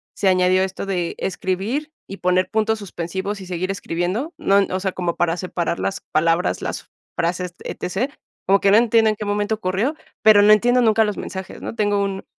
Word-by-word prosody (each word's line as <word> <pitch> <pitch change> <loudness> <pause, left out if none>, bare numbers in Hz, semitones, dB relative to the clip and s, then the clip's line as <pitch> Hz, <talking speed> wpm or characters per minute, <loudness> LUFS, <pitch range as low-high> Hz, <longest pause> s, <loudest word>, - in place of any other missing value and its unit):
se 200 - 0
añadió 185 0 +4
esto 190 +1 -4
de 180 -3 -1
escribir 200 - -2 0.2
y 195 - -8
poner 180 0 +1
puntos 220 0 0
suspensivos 190 +1 -4
y - - -8
seguir 180 +1 -3
escribiendo, 195 - -3
¿no?, 200 +1 +3
O 185 - -1
sea, 190 0 -1
como 175 -2 -2
para 175 0 0
separar 175 -2 -2
las 195 - -2
palabras, 165 +3 +1
las - - -5 0.2
frases, 180 +1 -2
etc. 220 +10 -3 0.3
Como 195 +1 +4
que 195 - +4
no 205 - +7
entiendo 225 -1 +4
en 215 - 0
qué 210 - -6
momento 205 +1 0
ocurrió, 210 +8 -1 0.3
pero 215 -1 +7
no 210 - +6
entiendo 245 +4 +3
nunca 225 -1 +4
los 210 -1 -2
mensajes, 190 0 -7
¿no? - - -6
Tengo 205 -2 +1
un 195 -1 -4
195 Hz, 195 wpm, -21 LUFS, 180-215 Hz, 0.3 s, no